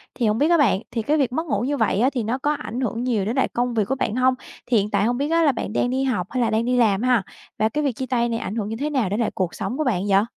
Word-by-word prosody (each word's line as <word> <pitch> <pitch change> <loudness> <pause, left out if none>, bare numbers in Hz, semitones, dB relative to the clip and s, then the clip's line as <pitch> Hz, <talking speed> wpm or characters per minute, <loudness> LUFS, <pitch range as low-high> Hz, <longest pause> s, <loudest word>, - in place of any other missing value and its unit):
Thì 235 -4 0
hổng 210 +1 +1
biết 300 +5 +2
á 340 - +5
bạn, 250 - +3
thì 230 - -1
cái 295 +8 +1
việc 260 -4 +1
mất 320 +4 -1
ngủ - - 0
như 285 +3 -1
vậy 220 -3 +1
á, 255 +3 +4
thì 245 -4 -1
nó 235 +4 -1
có 290 +3 0
ảnh 255 -3 -5
hưởng 240 -1 -2
nhiều 225 -6 0
đến 225 +4 -2
lại 265 - +2
công 245 0 -2
việc 215 -3 +1
của 270 - 0
bạn 230 -4 -2
hông? 255 0 +3 0.3
Thì 240 -2 +2
hiện 205 +1 +1
tại 210 - +1
không 245 +1 0
biết 285 +2 -1
là 330 -3 +4
bạn 225 -4 -5
đang 245 - +1
đi 265 +1 0
học 215 -9 -1
hay 255 - -1
là 230 - +2
đang 225 +1 0
đi 250 0 +1
làm 210 -4 +3
ha? 245 -5 +2 0.4
Và 220 - +3
cái 300 +7 -2
việc 280 - +1
chia 260 - -4
tay 240 -2 0
này 230 -1 -2
ảnh 210 - -5
hưởng 210 -2 -2
như 225 - -3
thế 300 +2 -1
nào 255 -10 0
đến 205 - -1
lại 230 - 0
cuộc 185 -3 -2
sống 255 - -4
của 310 - 0
bạn 200 -8 0
vậy? 195 +1 +4
245 Hz, 345 wpm, -22 LUFS, 220-265 Hz, 0.4 s, á